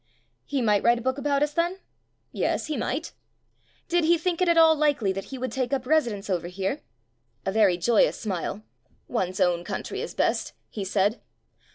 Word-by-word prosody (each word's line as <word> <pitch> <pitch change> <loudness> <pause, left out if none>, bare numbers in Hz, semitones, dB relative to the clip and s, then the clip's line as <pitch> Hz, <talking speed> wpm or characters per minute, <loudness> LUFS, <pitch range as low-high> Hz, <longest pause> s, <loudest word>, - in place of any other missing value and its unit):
He 275 -3 -1
might 210 -3 +3
write 235 +1 +4
a - - -5
book 260 +2 -1
about 285 0 +1
us, 295 0 -1
then? 345 +3 0 0.5
Yes, - - -1
he 310 - -3
might. 280 +6 -3 0.7
Did 345 0 +2
he 340 +2 +4
think 345 +1 -1
it 365 - +3
at 340 - +3
all 320 -1 +7
likely 290 -10 +2
that 195 0 -5
he 270 - -7
would 255 0 -3
take 260 -2 -2
up 265 -2 -1
residence 240 -9 +1
over 175 -3 -1
here? 190 +2 -3 0.7
A 195 - 0
very 200 -4 +4
joyous 220 +5 +3
smile. 185 - -3 0.4
"One's 185 0 -2
own 175 -1 +2
coun - - -4
try - - -6
is - - -5
best," - - 0 0.2
he 205 - -4
said. 200 +3 +1
245 Hz, 195 wpm, -26 LUFS, 195-305 Hz, 0.7 s, all